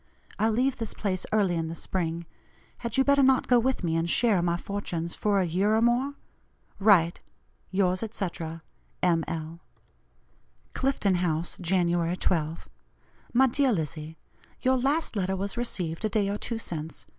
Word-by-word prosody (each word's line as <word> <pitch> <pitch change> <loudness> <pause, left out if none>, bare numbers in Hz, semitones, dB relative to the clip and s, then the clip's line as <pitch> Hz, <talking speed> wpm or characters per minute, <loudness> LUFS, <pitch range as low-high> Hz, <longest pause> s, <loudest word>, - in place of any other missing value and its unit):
I 220 +2 +3
leave 255 +4 +1
this 225 -3 -5
place 185 -3 -2
early 205 -4 +2
in 165 -1 -1
the 165 - -5
spring; 170 -1 -3 0.5
had 235 0 -4
you 265 - +5
better 280 0 +4
not 265 -1 +4
go 245 -1 +5
with 255 -2 0
me 165 -2 0
and 165 +1 0
share 210 -2 +3
my 170 0 +1
fortunes, 175 -4 -3
for 205 -2 +1
a 185 - +2
year 190 +6 +2
or 220 - +3
more? 250 +4 +2 0.6
Write. 190 -5 +4 0.5
"Yours, 185 -1 +1
etc., 170 -7 -4 0.4
M. 170 -2 +3
L." 165 0 -5 1.1
"CLIFTON 260 -8 +1
HOUSE, 170 -1 -1
January 175 -1 +1
12. 160 -3 -1 0.6
"MY 260 +3 +5
DEAR 265 0 +2
LIZZIE: 160 -2 -4 0.5
Your 260 0 +3
last 280 +3 0
letter 190 -1 0
was 195 +1 -3
received 185 -8 -3
a 215 - +1
day 205 -2 +1
or 205 - -1
two 230 - -3
since. 160 -7 -5
190 Hz, 160 wpm, -27 LUFS, 170-230 Hz, 1.1 s, you